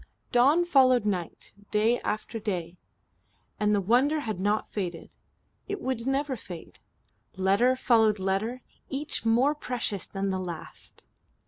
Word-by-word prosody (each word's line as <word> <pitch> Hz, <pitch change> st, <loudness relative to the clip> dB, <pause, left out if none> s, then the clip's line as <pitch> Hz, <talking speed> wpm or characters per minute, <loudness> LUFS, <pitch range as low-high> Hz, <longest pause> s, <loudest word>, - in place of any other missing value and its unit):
Dawn 280 Hz, +8 st, +4 dB
followed 255 Hz, -8 st, +4 dB
night, 180 Hz, -5 st, -3 dB, 0.2 s
day 220 Hz, +3 st, +2 dB
after 215 Hz, +2 st, -3 dB
day, 180 Hz, -6 st, -3 dB, 0.8 s
and 210 Hz, 0 st, +3 dB
the -, -, +2 dB
wonder 260 Hz, +10 st, +3 dB
had 215 Hz, -8 st, -4 dB
not 205 Hz, +3 st, 0 dB
faded. 180 Hz, -5 st, -5 dB, 0.5 s
It 405 Hz, 0 st, -3 dB
would 255 Hz, -2 st, -3 dB
never 270 Hz, 0 st, 0 dB
fade. 175 Hz, -7 st, -10 dB, 0.6 s
Letter 200 Hz, +7 st, +3 dB
followed 225 Hz, -4 st, +3 dB
letter, 195 Hz, +6 st, -2 dB, 0.3 s
each 280 Hz, -3 st, -2 dB
more 250 Hz, +6 st, +4 dB
precious 245 Hz, -, -3 dB
than 195 Hz, 0 st, -2 dB
the 190 Hz, -, -1 dB
last. 175 Hz, -3 st, -9 dB
225 Hz, 130 wpm, -27 LUFS, 195-255 Hz, 0.8 s, Dawn